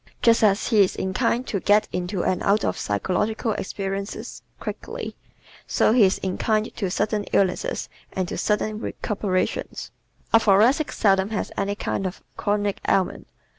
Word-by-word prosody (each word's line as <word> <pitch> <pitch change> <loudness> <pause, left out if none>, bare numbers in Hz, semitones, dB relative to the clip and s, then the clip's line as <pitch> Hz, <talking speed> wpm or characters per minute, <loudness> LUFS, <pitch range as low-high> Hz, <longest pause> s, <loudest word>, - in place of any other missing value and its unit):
Just 230 -1 +5
as 200 -1 +3
he 220 -4 +5
is 185 - -1
inclined 230 +6 0
to 200 - -2
get 210 +3 +3
into 180 0 -2
and 185 - 0
out 205 +2 +2
of - - 0
psychological 210 - -1
experiences 195 0 -4 0.2
quickly, - - -6 0.5
so - - +3
he 235 -4 +6
is 190 - +2
inclined 215 +3 -1
to 195 -5 -1
sudden 210 +2 0
illnesses 200 - 0 0.2
and 185 -1 -2
to - - -4
sudden 210 0 0
recuperations. 200 -4 -2 0.4
A 225 - +8
Thoracic 225 +9 +4
seldom 195 -1 +2
has 220 - -3
any 200 +1 -1
kind 195 -2 -2
of 180 - -8
chronic 205 -1 0
ailment. 190 -2 +1
205 Hz, 150 wpm, -24 LUFS, 190-220 Hz, 0.5 s, A